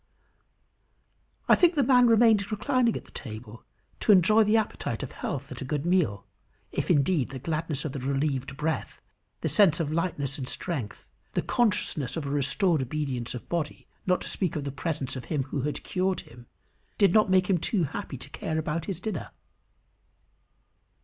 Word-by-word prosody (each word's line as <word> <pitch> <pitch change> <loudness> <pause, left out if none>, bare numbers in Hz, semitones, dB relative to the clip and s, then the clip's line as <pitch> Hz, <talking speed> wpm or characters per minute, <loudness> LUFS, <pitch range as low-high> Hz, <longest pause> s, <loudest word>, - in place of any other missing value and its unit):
I - - +7
think 350 -1 +5
the 285 - +3
man 250 -1 +5
remained 225 -3 +4
reclining 245 +1 +1
at - - -10
the - - -19
table, 110 -1 -9 0.4
to - - +3
enjoy 210 +3 +6
the 215 +2 +3
appetite 205 - -2
of 135 - -6
health 140 0 -5
at - - -7
a - - -2
good 145 +3 -2
meal; 170 - +1 0.5
if, - - -2
indeed, 145 -1 +2
the 135 - -6
gladness 155 +1 -3
of 150 - -2
the 140 - -5
relieved 135 0 -1
breath, 155 +3 -2 0.4
the - - 0
sense 185 -6 +4
of 155 -3 -1
lightness 155 -4 -1
and 130 - -4
strength, 135 - -4 0.3
the - - 0
consciousness 185 - +1
of 155 - -3
a 140 - -3
restored 145 +4 +2
obedience 130 -3 -3
of 125 - -8
body, 165 -3 -3 0.2
not 180 -1 +2
to - - -3
speak 185 -5 -1
of 150 - -2
the 140 - -3
presence 140 -2 -3
of 130 - -6
him 145 -4 -1
who 135 +1 -3
had 145 +2 -3
cured 185 0 -1
him, 120 0 -15 0.5
did 200 -4 +4
not 215 -2 +5
make 185 -1 +4
him 185 -3 +2
too 185 +2 +1
happy 155 -1 -4
to 125 - -10
care 160 - -3
about 160 +1 -2
his 190 -4 -4
dinner. 195 -5 -4
155 Hz, 185 wpm, -27 LUFS, 135-190 Hz, 0.5 s, I